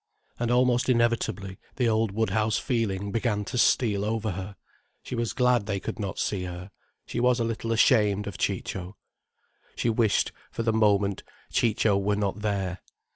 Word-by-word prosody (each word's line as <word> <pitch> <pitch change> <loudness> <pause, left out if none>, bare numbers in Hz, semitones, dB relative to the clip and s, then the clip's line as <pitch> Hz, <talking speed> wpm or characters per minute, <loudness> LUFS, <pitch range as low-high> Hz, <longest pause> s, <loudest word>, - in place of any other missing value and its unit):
And 120 -1 0
almost 125 0 +3
inevitably 115 -6 0 0.2
the 125 -3 +1
old 110 0 +2
Woodhouse 110 0 +1
feeling 100 -5 -1
began 105 -2 0
to 125 - -4
steal 105 -6 +3
over 110 0 -1
her, 95 +2 -6 0.5
she - - -7
was 120 -2 -1
glad 125 -4 +2
they 100 -2 -1
could - - -6
not 100 -2 -4
see 95 -3 -1
her, 90 +2 -7 0.3
she - - -4
was 125 0 +3
a - - +1
little 115 0 -3
ashamed 105 -3 +3
of 100 - -6
Ciccio. 95 +1 -3 0.8
She 115 - +1
wished, 110 -2 +2 0.2
for 115 - -4
the 115 -1 +1
moment, 100 -3 +2 0.3
Ciccio 105 -3 +2
were 100 +1 +1
not 100 0 -1
there. 100 -3 -2
110 Hz, 165 wpm, -27 LUFS, 100-115 Hz, 0.8 s, almost